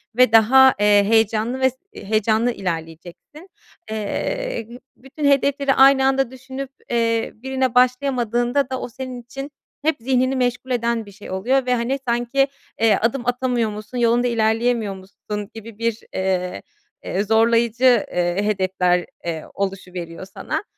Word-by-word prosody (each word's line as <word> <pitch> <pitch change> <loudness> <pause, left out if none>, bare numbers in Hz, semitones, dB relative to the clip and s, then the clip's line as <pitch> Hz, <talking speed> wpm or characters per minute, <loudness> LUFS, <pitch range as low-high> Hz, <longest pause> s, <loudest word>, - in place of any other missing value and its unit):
ve 255 -1 +5
daha, 260 +4 +7
eee, 205 0 +5
heyecanlı 225 +3 +1
ve 260 0 +4
s 260 - -17 0.2
heyecanlı 220 - 0
ilerleyeceksin. 175 - -7 0.4
Eee, 230 - -3 0.3
bütün 270 +4 -7
hedefleri 280 0 +2
aynı 270 0 +6
anda 270 -2 +1
düşünüp, 260 +1 -7 0.2
eee, 230 -1 0
birine 260 +1 -2
başlayamadığında 250 0 +1
da 260 -1 -3
o - - -5
senin 255 0 -7
için 270 +4 -8 0.3
hep 315 0 +2
zihnini 255 +2 +1
meşgul 250 0 -1
eden 235 -2 0
bir 200 - -13
şey 205 +1 -12
oluyor 250 +8 +1
ve, 250 0 +2
hani, 245 +4 -1
sanki, 240 +3 +1 0.3
eee, 225 -2 +5
adım 240 +3 0
atamıyormuşsun, 240 -3 -2
yolunda 240 +1 +2
ilerleyemiyormuşsun 220 -3 -2
gibi 225 -1 -10
bir, 230 -1 -1
eee, 180 - -2 0.4
eee, 195 +2 -1
zorlayıcı, 230 +2 +3
eee, 175 +1 0
hedefler, 185 -3 +1 0.2
eee, 165 -2 -3
oluşuveriyor 185 -3 -5
sana. 195 - -5
235 Hz, 135 wpm, -21 LUFS, 210-260 Hz, 0.4 s, daha